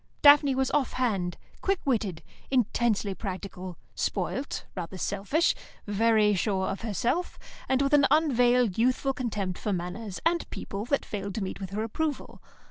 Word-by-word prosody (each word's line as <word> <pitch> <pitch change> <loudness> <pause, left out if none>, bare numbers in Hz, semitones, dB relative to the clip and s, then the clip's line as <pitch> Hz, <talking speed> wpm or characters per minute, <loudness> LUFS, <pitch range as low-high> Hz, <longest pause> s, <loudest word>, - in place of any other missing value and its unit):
Daphne 285 -2 +7
was 265 -1 +1
off 290 -3 +1
hand, 200 -9 0 0.2
quick 390 -1 +1
witted, 215 - 0 0.3
intensely 235 -5 +1
practical, 185 -2 -6 0.2
spoilt, 275 - -2
rather 180 0 -5
selfish, 205 - +1 0.3
very 215 0 +3
sure 190 -1 0
of 195 - -4
herself, 235 - -1 0.3
and 265 +1 +3
with 275 +1 0
an 285 -2 +6
unveiled 245 - +3
youthful 255 +3 +2
contempt 205 -8 -3
for 210 - -2
manners 185 +3 -4
and 340 0 +1
people 200 +2 -5
that 280 +3 0
failed 200 -2 -4
to 220 - -2
meet 190 - -5
with 190 - -4
her 210 +3 -2
approval. 290 +6 -3
225 Hz, 150 wpm, -28 LUFS, 195-265 Hz, 0.3 s, Daphne